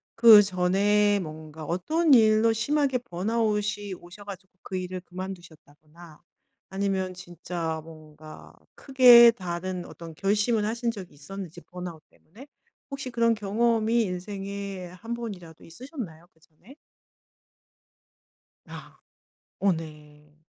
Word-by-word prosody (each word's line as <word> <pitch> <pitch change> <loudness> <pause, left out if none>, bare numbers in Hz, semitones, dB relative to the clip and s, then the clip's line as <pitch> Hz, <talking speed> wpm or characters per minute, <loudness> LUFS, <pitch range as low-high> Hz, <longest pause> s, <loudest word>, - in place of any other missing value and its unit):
그전에 205 -1 +5
뭔가 155 -2 -8
어떤 300 - +1
일로 220 -1 +5
심하게 265 +2 0
번아웃이 210 -1 -2
오셔 175 +4 -13
가지고 190 -1 -10
그 185 - -5
일을 185 0 -5
그만두셨다거나 170 -3 -11 0.5
아니면 190 -1 -2
진짜 175 -3 -5
뭔가 155 -1 -14 0.2
크게 245 -3 +7
다른 180 -2 -5
어떤 165 -1 -11
결심을 210 +4 +1
하신 235 +2 -1
적이 195 -5 -10
있었는지 175 +3 -9
번아웃 175 -3 -9
때문에. 225 - -17 0.4
혹시 275 -2 -5
그런 230 -1 +2
경험이 225 +2 +1
인생에 195 0 -6
한 205 +7 -8
번이라도 195 -9 -8
있으셨나요? 175 - -9
그전에? 160 - -20 1.9
아. - - -11 0.6
어 195 -1 +3
네. 150 -2 -9
190 Hz, 255 characters per minute, -26 LUFS, 170-225 Hz, 1.9 s, 크게